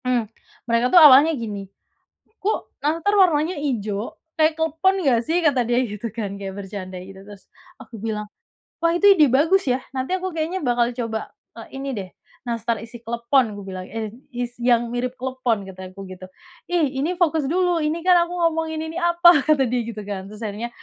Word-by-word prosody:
Mmm. 250 -3 +1 0.4
Mereka 235 +1 +2
tuh 355 - +9
awalnya 295 +2 +8
gini, 205 -4 -6 0.7
"Kok 420 +3 -3
nastar 330 +7 +1
warnanya 340 -2 +3
ijo, 220 -7 -3 0.2
kayak 315 0 +4
klepon 325 +5 +1
nggak 255 -8 +3
sih?" 340 +3 +1
Kata 275 -4 +3
dia 240 +1 +1
gitu 210 +1 -5
kan 205 -4 -4
kayak 195 -1 -6
bercanda 190 -2 -7
gitu. 190 +1 -12
Terus 205 -1 -13 0.4
aku 235 - -12
bilang, 210 -1 -3 0.5
"Wah 335 0 +2
itu 405 - +3
ide 310 -6 +5
bagus 320 +5 +3
ya, 250 +1 +1 0.2
nanti 260 +8 -1
aku 375 0 -4
kayaknya 330 +4 -2
bakal 240 -1 +1
coba, 230 -3 -3 0.3
eee, 230 +4 -10
ini 275 0 -4
deh 190 -3 -6 0.4
nastar 230 0 -1
isi 230 +2 -10
klepon," 235 0 +1
Ku 205 - -8
bilang. 185 -1 -6
Eh, 220 -2 -5 0.2
is 245 0 -4
"Yang 240 -1 +2
mirip 245 +1 -2
klepon," 255 -5 -1
kata 185 -1 -9
aku 195 +1 -9
gitu. 185 0 -10 0.4
"Ih 340 -4 +2
ini 340 +6 -1
fokus 320 -3 +2
dulu, 355 +1 +1
ini 310 +3 -1
kan 365 -1 +6
aku - - -8 0.2
ngomongin 320 -1 -3
ini 320 +1 -7
apa?" 345 -2 +6
Kata 300 -3 +3
dia 245 +1 0
gitu 220 -2 -6
kan. 195 -2 -5
Terus 210 +1 -11
akhirnya, 215 +3 -4
250 Hz, 185 wpm, -22 LUFS, 215-320 Hz, 0.7 s, tuh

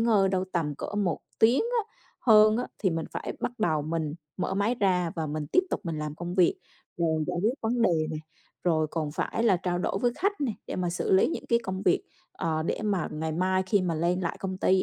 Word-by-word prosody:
ngơi 215 -4 +4
đâu 185 0 0
tầm 155 -4 0
cỡ 205 - -6
1 195 -6 0 0.2
tiếng 235 +4 +5
á, 460 -2 -1 0.3
hơn 215 -2 +6
á, 245 - -1
thì 190 - +1
mình 165 -1 -2
phải - - -4
bắt 245 0 -3
đầu 160 -8 +1
mình 155 -1 -2 0.2
mở 185 - -1
máy 205 +5 +1
ra 180 -4 +2
và 160 -1 -1
mình 150 0 -3
tiếp 365 - +3
tục - - -1
mình 165 -2 -3
làm 150 -1 -4
công 175 +2 -5
việc. 180 -3 +4 0.4
Rồi 160 -2 +1
giải 180 - -2
quyết 230 +4 +2
vấn 235 +1 0
đề 165 -7 +3
này, 155 -1 -4 0.4
rồi 160 -3 +2
còn 155 -3 -2
phải 225 - -1
là 205 -6 +4
trao 175 0 -1
đổi 195 - -1
với 240 -1 +3
khách 400 0 0
nè, 260 -6 0
để - - -4
mà 180 -1 0
xử 175 - -1
lý 190 - +5
những - - -4
cái 235 - +4
công 190 -2 -4
việc, 180 - +3 0.3
ờ, 160 -3 -1
để 170 - -2
mà 200 -5 0
ngày 160 +1 -2
mai 185 +3 +1
khi 200 -1 +3
mà 170 -3 0
lên 175 +3 +1
lại 170 - -2
công 190 -1 -3
ty 190 -1 +3
185 Hz, 245 wpm, -28 LUFS, 165-215 Hz, 0.4 s, hơn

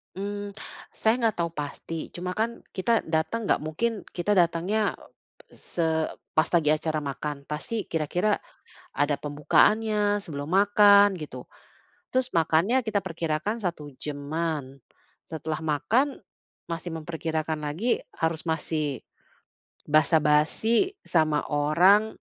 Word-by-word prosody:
Mmm, 205 +1 -5 0.4
saya 220 - +3
nggak 225 -3 +1
tahu 170 0 +1
pasti. 155 +1 -5
Cuma 180 +1 -3
kan, 230 +2 -2
kita 225 +4 +1
datang 160 +8 -1
nggak - - +3
mungkin 160 +10 -1 0.2
kita 180 +3 -2
datangnya, 180 +5 +2 0.6
eee, - - -18
se 170 - -3 0.5
pas 155 - +4
lagi 160 -3 +4
acara 155 0 -2
makan, 140 0 -5
pasti 210 +9 -3
kira-kira 175 +6 0 0.6
ada 145 +1 +2
pembukaannya 205 +9 +2
sebelum 145 -4 -6
makan 205 +1 +6
gitu. 150 -2 -8 0.7
Terus 255 0 +1
makannya 165 +10 +3
kita 215 -2 0
perkirakan 165 +3 -2
1 165 -5 -3
jam-an, 145 -1 -4 0.5
setelah 160 -1 -4
makan 230 - +1 0.5
masih 165 +1 -4
memperkirakan 160 -1 -3
lagi 165 +12 -1
harus 160 -1 -1
masih 160 -3 -2 0.9
basa-basi 155 - +3
sama 155 -3 +2
orang, 175 +9 +4
165 Hz, 115 wpm, -26 LUFS, 150-205 Hz, 0.9 s, makan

